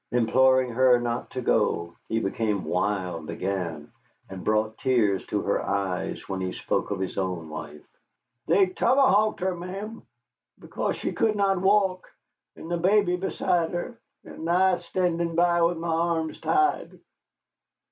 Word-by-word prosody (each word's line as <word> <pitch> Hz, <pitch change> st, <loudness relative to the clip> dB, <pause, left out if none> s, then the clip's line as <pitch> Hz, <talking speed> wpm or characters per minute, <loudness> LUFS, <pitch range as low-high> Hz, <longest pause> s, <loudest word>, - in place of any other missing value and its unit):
Imploring 130 Hz, +2 st, +3 dB
her 125 Hz, +1 st, +4 dB
not 120 Hz, 0 st, -3 dB
to 130 Hz, -, -5 dB
go, 85 Hz, -5 st, 0 dB
he 115 Hz, -, +1 dB
became 105 Hz, -1 st, -1 dB
wild 90 Hz, -4 st, -2 dB
again, 90 Hz, -6 st, -4 dB, 0.4 s
and 95 Hz, -1 st, -7 dB
brought 110 Hz, +1 st, 0 dB
tears 110 Hz, -7 st, +2 dB
to -, -, -1 dB
her -, -, 0 dB
eyes 95 Hz, -2 st, -3 dB
when 95 Hz, -1 st, -3 dB
he 95 Hz, 0 st, -3 dB
spoke -, -, -2 dB
of 100 Hz, -2 st, -3 dB
his 95 Hz, +1 st, -3 dB
own 90 Hz, -4 st, -3 dB
wife. 75 Hz, -1 st, -8 dB, 0.6 s
"They 190 Hz, +4 st, +5 dB
tomahawked 215 Hz, +2 st, +2 dB
her, 185 Hz, 0 st, 0 dB
ma'am, 195 Hz, +6 st, -7 dB, 0.6 s
because -, -, -3 dB
she -, -, -3 dB
could 220 Hz, -1 st, +1 dB
not 195 Hz, -2 st, +1 dB
walk, 190 Hz, -2 st, +2 dB, 0.5 s
and 165 Hz, -, -9 dB
the 175 Hz, -, +1 dB
baby 185 Hz, +1 st, +3 dB
beside 180 Hz, -2 st, -1 dB
her, 200 Hz, +7 st, -5 dB, 0.3 s
and 165 Hz, -, -7 dB
I 180 Hz, +1 st, +3 dB
standing 170 Hz, -1 st, -1 dB
by 175 Hz, 0 st, +3 dB
with 170 Hz, 0 st, +2 dB
my 170 Hz, +1 st, -4 dB
arms 165 Hz, -1 st, -1 dB
tied." 380 Hz, 0 st, 0 dB
160 Hz, 145 wpm, -26 LUFS, -, 0.6 s, They